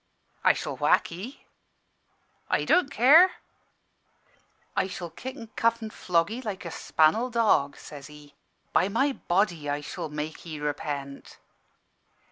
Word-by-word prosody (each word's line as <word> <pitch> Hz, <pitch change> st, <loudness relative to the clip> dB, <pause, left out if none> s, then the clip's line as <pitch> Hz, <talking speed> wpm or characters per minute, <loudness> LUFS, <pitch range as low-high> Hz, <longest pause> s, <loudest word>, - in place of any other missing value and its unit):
"'I -, -, +6 dB
shall -, -, -5 dB
whack -, -, +2 dB
'ee.' 195 Hz, +11 st, -9 dB, 1.0 s
"'I -, -, +1 dB
don't 360 Hz, -6 st, +3 dB
care.' 300 Hz, -, +6 dB, 1.4 s
"'I -, -, +1 dB
shall 175 Hz, -3 st, -7 dB
kick 260 Hz, +2 st, -7 dB
an' 230 Hz, -5 st, -11 dB
cuff 230 Hz, 0 st, +2 dB
an' 220 Hz, -, -6 dB
flog 170 Hz, -1 st, 0 dB
'ee 240 Hz, +3 st, -5 dB
like 205 Hz, -6 st, -5 dB
a 170 Hz, -, -5 dB
span'el 165 Hz, +12 st, +2 dB
dog,' 220 Hz, -, +2 dB
says 140 Hz, -3 st, -10 dB
he: 150 Hz, -1 st, -15 dB, 0.4 s
'by 185 Hz, -, +3 dB
my 275 Hz, +8 st, +2 dB
body! 175 Hz, -, 0 dB
I 145 Hz, +1 st, -1 dB
shall 150 Hz, -, -6 dB
make 150 Hz, +1 st, -5 dB
'ee 155 Hz, -3 st, -7 dB
repent.' 145 Hz, -1 st, -5 dB
175 Hz, 140 wpm, -27 LUFS, 150-230 Hz, 1.4 s, I